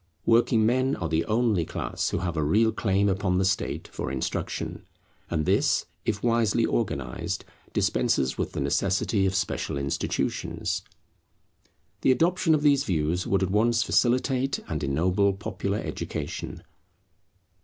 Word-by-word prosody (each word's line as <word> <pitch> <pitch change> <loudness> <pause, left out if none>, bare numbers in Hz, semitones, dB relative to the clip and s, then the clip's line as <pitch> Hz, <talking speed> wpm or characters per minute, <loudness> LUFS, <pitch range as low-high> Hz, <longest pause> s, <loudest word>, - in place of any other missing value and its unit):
Working 115 -1 +4
men 130 +4 +2
are 85 - -3
the 80 +1 0
only 110 -3 +2
class - - -3
who - - -1
have 85 -2 -2
a 80 - 0
real 110 +10 +3
claim 100 -2 +1
upon 95 -1 +1
the 95 - +2
State 95 +1 -1
for - - -4
instruction; 65 -1 -3 0.5
and 80 -3 -1
this, - - +2 0.2
if 100 -2 -1
wisely 115 -3 +2
organized, - - -2 0.3
dispenses 65 -1 +1
with - - -3
the - - -2
necessity 95 +1 +1
of 95 - -1
special 95 - -1
institutions. 70 -1 -2 1.2
The - - +4
adoption 165 +3 +3
of 150 - -1
these 140 -2 +4
views 85 +1 -1
would 95 -1 +2
at 95 - -1
once 115 +2 +3
facilitate 130 +3 +1
and 75 -2 -3
ennoble 90 +8 +2
popular 100 0 -3
education. - - -5
100 Hz, 140 wpm, -26 LUFS, 85-115 Hz, 1.2 s, Working